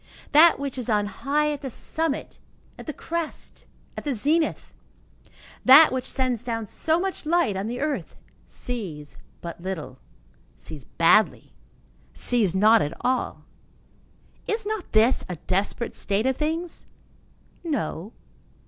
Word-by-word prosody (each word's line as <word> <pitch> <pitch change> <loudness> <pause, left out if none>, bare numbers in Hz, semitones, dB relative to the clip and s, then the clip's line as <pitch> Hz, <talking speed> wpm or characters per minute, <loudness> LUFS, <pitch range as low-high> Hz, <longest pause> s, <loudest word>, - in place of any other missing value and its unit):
That 325 +3 +7
which 275 -2 -4
is 245 - -4
on 210 -2 +2
high 280 +9 0
at 290 - -5
the 270 - -4
summit, 315 +4 -3 0.4
at - - -10
the - - -2
crest, 330 +2 -6 0.3
at - - -6
the 285 -4 -1
zenith, 310 +8 0 0.9
that 285 +5 +9
which 255 -1 -2
sends 255 -3 0
down 230 -2 -3
so 320 - +1
much 380 +1 -3
light 325 - +1
on 195 +2 -3
the 245 +2 -4
earth, 300 -1 -3 0.3
sees 175 -12 -6 0.2
but 170 0 -7
little, 155 -9 -6 0.6
sees 145 -4 -10
badly, 205 +6 +3 0.6
sees 215 -8 0
not 215 +3 +5
at 150 +3 -3
all? 255 0 -1 1.0
Is 440 0 -2
not 430 -3 -4
this 225 +3 +4
a 180 - -3
desperate 195 +7 -2
state 205 +3 0
of 265 0 +2
things? 320 +4 -3 0.8
No. 255 - -3
250 Hz, 135 wpm, -25 LUFS, 205-305 Hz, 1.0 s, that